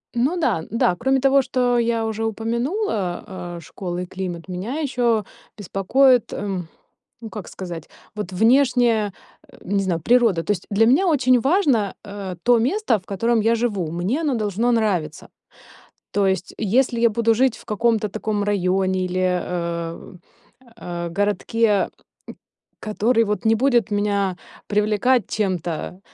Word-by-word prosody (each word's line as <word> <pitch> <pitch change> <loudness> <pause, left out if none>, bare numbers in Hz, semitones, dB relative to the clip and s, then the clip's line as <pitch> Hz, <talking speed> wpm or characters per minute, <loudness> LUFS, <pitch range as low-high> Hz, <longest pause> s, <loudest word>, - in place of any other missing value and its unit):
Ну 275 +10 +1
да, 305 - +1
н-да, 180 0 0
кроме 265 +1 +2
того, 275 +1 +4
что 245 -1 +1
я 230 -1 0
уже 220 0 -3
упомянула, 225 - -2 0.3
э, - - -7
школа 175 +1 -6
и - - -4
климат, 180 -2 -6
меня 200 - -4
ещё 240 -7 +1 0.3
беспокоит, 240 +6 +2
э, 195 -3 -3 0.6
ну, 225 - -6
как 210 -4 -7
сказать, 175 -4 -8 0.2
вот 210 -3 -5
внешняя, 235 -1 +3 0.4
э, - - -16
не 200 -1 +2
знаю, 175 -3 -1
природа. 230 -4 +3
То 205 - 0
есть, 185 - -5
для 220 +2 +3
меня 305 +11 +4
очень 255 -6 +3
важно, 270 - +2
э, 200 -3 -6
то 240 -1 +4
место, 320 - +1
в 185 - -18
котором 230 +3 +1
я 230 +1 +3
живу, 205 -9 -1
мне 185 - -1
оно 295 -5 0
должно 215 +1 -1
нравиться. 200 -10 0 0.8
То 200 -1 +1
есть, 190 -1 -1
если 235 +3 +1
я 235 0 +4
буду 230 +1 +2
жить 255 0 +2
в - - -16
каком-то 220 0 +1
таком 210 0 -2
районе 190 -2 +1
или, 180 0 -5
э, 170 -2 -2 0.6
а, 175 -3 -5
городке, 205 +1 +1 0.9
который 225 +2 +1
вот 210 +1 -2
не 225 - +5
будет 240 -3 +2
меня 200 -2 0 0.3
привлекать 215 +4 +2
чем-то, 180 -3 -2
215 Hz, 145 wpm, -22 LUFS, 190-240 Hz, 0.9 s, не